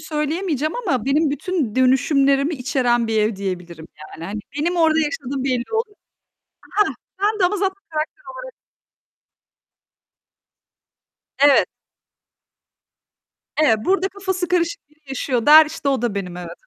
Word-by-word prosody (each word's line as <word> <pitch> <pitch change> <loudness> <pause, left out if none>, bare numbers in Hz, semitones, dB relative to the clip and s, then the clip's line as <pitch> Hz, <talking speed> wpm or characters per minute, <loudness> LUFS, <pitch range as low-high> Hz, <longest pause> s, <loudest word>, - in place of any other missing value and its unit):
söyleyemeyeceğim 310 0 -2
ama 285 - -1
benim 295 +3 +2
bütün 295 - -2
dönüşümlerimi 275 +3 +3
içeren 245 -3 0
bir 220 -1 0
ev 215 0 +1
diyebilirim 180 -4 -6 0.2
yani 165 - -10
hani 210 +3 -5 0.2
benim 345 +4 0
orada 320 -1 +3
yaşadığım 285 -4 -2
belli 250 -3 0
olur, 445 -1 -2 0.8
hah. 420 -1 +2 0.3
Ben 425 +1 +1
de 365 - +4
onu 405 +3 0
zaten 385 0 0 0.2
karakter 320 - -17 0.5
olarak... - - -9 2.9
Evet. 285 0 +5 2.0
Evet, 225 -7 +5
burada 385 0 +1
kafası 380 -2 -3
karışık 340 -4 -1
biri 305 - -29
yaşıyor 255 -2 -2
der, 310 +1 +9
işte 295 -2 -4
o 265 -4 0
da 235 -4 -1
benim, 180 -3 -5
evet. 175 -1 -8
285 Hz, 130 wpm, -21 LUFS, 240-345 Hz, 2.9 s, der